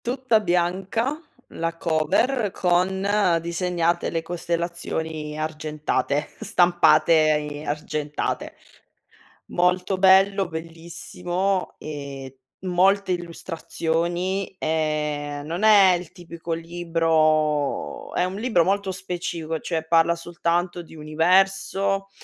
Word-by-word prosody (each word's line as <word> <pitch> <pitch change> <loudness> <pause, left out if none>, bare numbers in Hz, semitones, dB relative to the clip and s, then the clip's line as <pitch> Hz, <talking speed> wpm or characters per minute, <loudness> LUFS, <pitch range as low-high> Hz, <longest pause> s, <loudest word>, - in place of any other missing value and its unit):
Tutta 250 -2 +2
bianca, 190 +7 0 0.3
la 165 0 -4
cover, 185 - +1
con 190 +1 +1
disegnate 170 0 -1
le 165 -1 -2
costellazioni 165 -3 -3
argentate, 155 -1 -2
stampate 175 -1 +4 0.4
i 145 +1 -7
argentate. 150 0 -3 0.9
Molto 180 +2 +1
bello, 195 +1 +5
bellissimo 175 +3 -3
e 140 -3 -7 0.3
molte 190 +2 +3
illustrazioni, 175 +2 -3
ehm, 150 -2 -1
non 170 +5 -3
è 200 -4 +7
il 175 -1 -7
tipico 170 -2 -7
libro 165 -3 0
è - - +1
un 185 +1 -2
libro 210 -5 +2
molto 195 +1 0
specifico, 175 -3 -4
cioè 160 0 -3
parla 165 0 +4
soltanto 175 +1 -2
di 165 - -16
universo, 195 +5 +1
170 Hz, 90 wpm, -24 LUFS, 160-190 Hz, 0.9 s, è